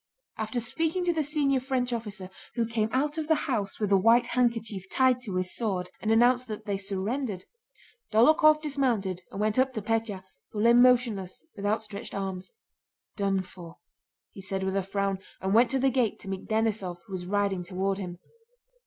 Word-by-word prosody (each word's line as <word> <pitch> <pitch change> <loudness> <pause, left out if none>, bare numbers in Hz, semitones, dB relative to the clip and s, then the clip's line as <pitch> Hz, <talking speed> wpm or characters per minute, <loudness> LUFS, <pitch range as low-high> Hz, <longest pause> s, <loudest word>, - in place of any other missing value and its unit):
After 220 +2 -2
speaking 325 +9 -1
to 345 - +2
the 320 - 0
senior 285 -2 +1
French 255 -1 -1
officer, 205 -5 -5 0.2
who 235 -2 +1
came 225 -1 -1
out 295 +4 0
of 310 - -3
the 320 - +4
house 205 -7 -2
with 210 -2 -1
a 195 - +6
white 230 +5 +5
handkerchief 230 -6 -1
tied 255 -1 +3
to 205 -7 -5
his 185 0 -1
sword 190 -6 -2
and 215 - -2
announced 245 +2 +4
that 215 -2 -6
they 200 - -1
surrendered, 200 +3 -3 0.7
Dólokhov 305 +7 +5
dismounted 240 - 0
and - - -7
went 215 +3 +1
up 260 0 +2
to 220 - -3
Pétya, 225 -3 -1 0.3
who 210 - -6
lay 235 +1 +6
motionless 240 - +3
with 205 -1 -3
outstretched 215 0 -3
arms. 190 -2 -4 0.7
"Done 195 -2 0
for!" 170 -2 -12 0.5
he 195 - -10
said 190 0 -3
with 190 0 -1
a 195 - +2
frown, 195 0 -1 0.2
and 190 +1 -1
went 235 +2 +5
to 270 - +1
the 265 +1 +3
gate 250 -4 +1
to - - -12
meet 195 -1 -5
Denísov 220 -5 0
who 200 - -11
was 180 -1 -4
riding 200 -1 0
toward 190 +2 -2
him. 180 -2 -6
220 Hz, 190 wpm, -28 LUFS, 195-250 Hz, 0.7 s, a